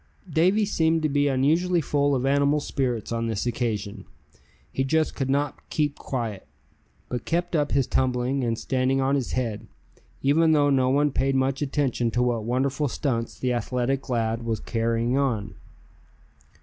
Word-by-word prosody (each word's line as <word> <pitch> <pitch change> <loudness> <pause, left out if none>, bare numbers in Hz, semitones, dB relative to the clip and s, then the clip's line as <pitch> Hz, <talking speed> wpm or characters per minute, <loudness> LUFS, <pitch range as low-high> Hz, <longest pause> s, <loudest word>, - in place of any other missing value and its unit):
Davy 185 +6 +3
seemed 160 -4 +1
to 155 - +2
be 145 0 +2
unusually 160 +7 +2
full 145 -2 +1
of 130 0 -1
animal 140 +2 +3
spirits 125 -7 -2
on 115 0 -1
this 110 -1 -2
occasion. 110 -4 -3 0.7
He 135 - -1
just 155 +3 +1
could 135 -1 -3
not 140 +1 -1
keep 145 -2 -1
quiet, 115 -7 -4 0.6
but 125 -2 -4
kept 175 +1 -1
up 145 -2 +1
his 135 -2 +3
tumbling, 130 +1 0
and 115 -1 0
standing 130 +1 0
on 135 +1 +1
his 135 -4 -1
head, 115 -5 -2 0.6
even 160 +4 +4
though 145 -1 +3
no 130 -2 +3
one 145 +2 +2
paid 135 +1 0
much 135 +1 0
attention 135 -4 0
to 120 +2 +1
what 120 -3 0
wonderful 135 +4 0
stunts 120 -4 -2
the 125 -1 0
athletic 125 +3 -1
lad 115 -1 0
was 115 -1 -2
carrying 115 +2 0
on. 115 -7 -1
135 Hz, 160 wpm, -25 LUFS, 120-145 Hz, 0.7 s, even